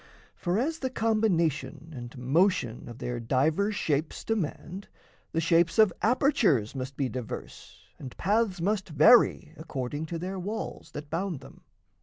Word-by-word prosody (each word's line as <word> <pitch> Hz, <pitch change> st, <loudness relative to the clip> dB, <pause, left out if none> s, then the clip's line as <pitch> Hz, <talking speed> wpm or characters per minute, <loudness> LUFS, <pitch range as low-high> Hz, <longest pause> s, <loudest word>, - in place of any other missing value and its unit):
For, 180 Hz, +1 st, -1 dB
as 315 Hz, +8 st, -1 dB
the 260 Hz, -, -2 dB
combination 170 Hz, -, 0 dB
And 120 Hz, +1 st, -8 dB
motion 130 Hz, -, +1 dB
of 120 Hz, -, -9 dB
their 120 Hz, -1 st, -4 dB
divers 155 Hz, -, +1 dB
shapes 155 Hz, -2 st, -1 dB
demand, 195 Hz, -2 st, -3 dB, 0.4 s
The 165 Hz, -, 0 dB
shapes 170 Hz, +2 st, +3 dB
of 215 Hz, -4 st, +6 dB
apertures 220 Hz, -, +2 dB
must 135 Hz, 0 st, -6 dB
be 135 Hz, -, 0 dB
diverse 125 Hz, -3 st, -8 dB, 0.2 s
And 130 Hz, -3 st, -9 dB
paths 205 Hz, -1 st, +1 dB
must 190 Hz, +2 st, -1 dB
vary 155 Hz, -, +5 dB
according 145 Hz, -1 st, -4 dB
to 170 Hz, -, -4 dB
their 185 Hz, +3 st, -4 dB
walls 210 Hz, +4 st, -5 dB
That 145 Hz, 0 st, -8 dB
bound 170 Hz, -3 st, -2 dB
them. -, -, -14 dB
165 Hz, 145 wpm, -28 LUFS, 135-205 Hz, 0.4 s, of